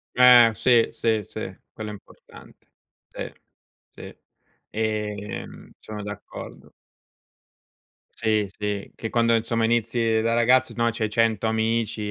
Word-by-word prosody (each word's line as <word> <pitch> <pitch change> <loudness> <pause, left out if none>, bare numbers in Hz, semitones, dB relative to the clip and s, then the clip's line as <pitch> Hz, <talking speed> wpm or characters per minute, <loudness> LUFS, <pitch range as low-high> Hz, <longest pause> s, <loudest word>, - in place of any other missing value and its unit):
Eh, 125 -2 +8
sì, 115 +1 +3
sì, 110 -3 0
sì, - - -7 0.2
quello 110 -1 -7
è - - -6
importante. 105 - -16 0.4
Sì, - - -7 0.6
sì, - - -11 0.5
ehm, 105 -2 -4
sono 105 -1 -8
d'accordo. 105 0 -9 1.4
Sì, 110 -2 0
sì, 105 0 -4
che 115 - -5
quando 115 -1 +2
insomma 115 0 0
inizi 115 -1 +1
da 115 +1 +1
ragazzo 120 +2 +3
no, 115 0 +1
c'hai 110 -1 -2
100 115 -1 +1
amici 110 -1 -1
110 Hz, 120 wpm, -24 LUFS, 105-115 Hz, 1.4 s, Eh